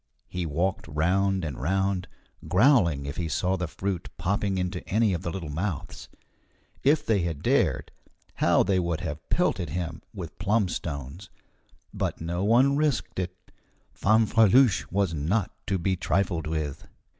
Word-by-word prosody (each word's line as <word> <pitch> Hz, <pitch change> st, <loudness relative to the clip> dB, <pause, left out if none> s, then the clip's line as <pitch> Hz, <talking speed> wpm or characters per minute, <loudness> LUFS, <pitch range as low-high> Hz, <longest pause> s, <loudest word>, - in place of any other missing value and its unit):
He 90 Hz, -2 st, -3 dB
walked 85 Hz, +5 st, -1 dB
round 90 Hz, +5 st, +1 dB
and 70 Hz, -5 st, -5 dB
round, 95 Hz, +3 st, 0 dB, 0.4 s
growling 90 Hz, -, +4 dB
if 70 Hz, -, -5 dB
he 85 Hz, -, -2 dB
saw 90 Hz, +4 st, 0 dB
the 90 Hz, -2 st, -2 dB
fruit 95 Hz, +2 st, -4 dB
popping 100 Hz, 0 st, 0 dB
into 90 Hz, 0 st, -2 dB
any 110 Hz, 0 st, +3 dB
of 85 Hz, -, -2 dB
the 85 Hz, -, -3 dB
little 85 Hz, -4 st, -5 dB
mouths. 85 Hz, 0 st, -4 dB, 0.7 s
If 150 Hz, +2 st, +3 dB
they 110 Hz, -3 st, +2 dB
had 85 Hz, -4 st, -3 dB
dared, -, -, +1 dB, 0.5 s
how -, -, +4 dB
they 95 Hz, -2 st, +2 dB
would 85 Hz, -2 st, -1 dB
have 80 Hz, -3 st, -6 dB
pelted 85 Hz, -, +1 dB
him 80 Hz, 0 st, -4 dB
with 85 Hz, -7 st, -8 dB
plum 100 Hz, 0 st, +2 dB
stones! 75 Hz, +3 st, -5 dB, 0.6 s
But -, -, -2 dB
no 85 Hz, +3 st, -2 dB
one 125 Hz, +6 st, +4 dB
risked 145 Hz, -9 st, 0 dB
it. 90 Hz, 0 st, -6 dB, 0.4 s
Fanfreluche 110 Hz, 0 st, +4 dB
was 95 Hz, -2 st, +1 dB
not 85 Hz, +7 st, 0 dB, 0.2 s
to 95 Hz, -, +1 dB
be 95 Hz, +2 st, 0 dB
trifled 85 Hz, -2 st, 0 dB
with. 80 Hz, -2 st, -3 dB
90 Hz, 150 wpm, -27 LUFS, 80-100 Hz, 0.7 s, growling